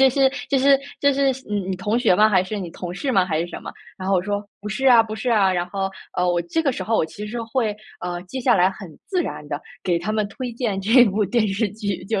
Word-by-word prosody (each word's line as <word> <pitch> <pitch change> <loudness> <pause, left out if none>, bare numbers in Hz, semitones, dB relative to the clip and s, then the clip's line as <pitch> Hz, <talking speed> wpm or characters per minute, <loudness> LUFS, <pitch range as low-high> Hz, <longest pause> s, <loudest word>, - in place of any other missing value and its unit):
这 265 - +7
是 270 +1 +4 0.2
这 275 - +2
是 275 +1 +5 0.2
这 280 0 +4
是 275 0 +2 0.2
嗯， 200 -2 -2
你 185 - -2
同 210 +5 0
学 185 - +4
吗？ 215 +2 +6
还 190 -3 +3
是 205 +3 -4
你 175 -3 -5
同 175 0 -6
事 270 +7 -2
吗？ 190 -3 +4
还 160 -4 -1
是 170 - -2
什 - - -7
么？” - - -7 0.2
然 185 0 -5
后 195 - +3
我 180 - +2
说： 205 +1 -2 0.2
“不 210 - -6
是 265 +5 -1
啊， 235 -3 +8
不 215 -1 -6
是 235 +3 -2
啊。 195 -4 +4
“然 175 0 -1
后， 195 0 -2 0.3
呃， 180 0 +2
我 175 0 +1
这 325 - -1
个 275 - +1
时 195 - -4
候 225 +3 0
我 - - +2
其 210 +6 -8
实 235 +2 -4
会 225 -2 -1 0.3
呃， 175 -1 -4
接 260 +8 -6
下 245 -1 +4
来 180 +1 +5
很 195 -1 -10 0.2
自 365 -3 0
然 150 - -6
的 145 +1 -3 0.2
给 175 -2 +2
他 185 +5 -4
们 215 -1 0
推 245 +3 -6
荐 225 -5 -2
这 235 +5 +6
部 210 0 +1
电 215 +2 +1
视 205 +2 0
剧， 200 -3 -4
就 215 -2 0
210 Hz, 305 characters per minute, -22 LUFS, 185-240 Hz, 0.3 s, 啊